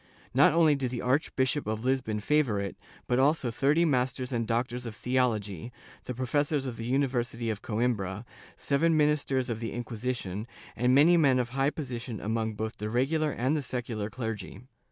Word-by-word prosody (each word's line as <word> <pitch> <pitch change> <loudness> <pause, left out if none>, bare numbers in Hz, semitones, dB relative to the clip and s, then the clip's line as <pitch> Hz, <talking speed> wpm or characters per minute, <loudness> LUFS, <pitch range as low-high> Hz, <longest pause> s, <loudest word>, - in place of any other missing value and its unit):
Not 145 +7 +6
only 160 -1 +5
did 135 -3 -1
the 120 -1 -4
Archbishop 130 0 +1
of 110 +2 -3
Lisbon 130 -5 0
favor 140 -5 +2
it, 100 -1 -4 0.3
but 125 +1 +1
also 135 -3 +2
thirty 145 +8 +3
masters 130 -2 0
and 115 -3 -1
doctors 120 +1 -1
of 110 - -7
theology, 120 -6 -1 0.3
the 125 - -4
professors 145 +3 0
of 125 -3 -5
the 115 - -5
University 120 -3 0
of 105 - -5
Coimbra, 110 -3 -1 0.3
seven 160 +3 +2
ministers 150 -4 +2
of 115 -3 -3
the 115 -1 -4
Inquisition, 115 -3 -4 0.3
and 125 +1 +3
many 165 +5 +6
men 140 -5 +4
of 125 -1 0
high 135 +2 +1
position 125 -7 -5
among 110 +1 -1
both 110 +2 -4
the 105 +1 -4
regular 145 +7 +1
and 130 +2 0
the 150 - 0
secular 120 -5 -3
clergy. 110 -4 -5
125 Hz, 175 wpm, -29 LUFS, 115-140 Hz, 0.3 s, Not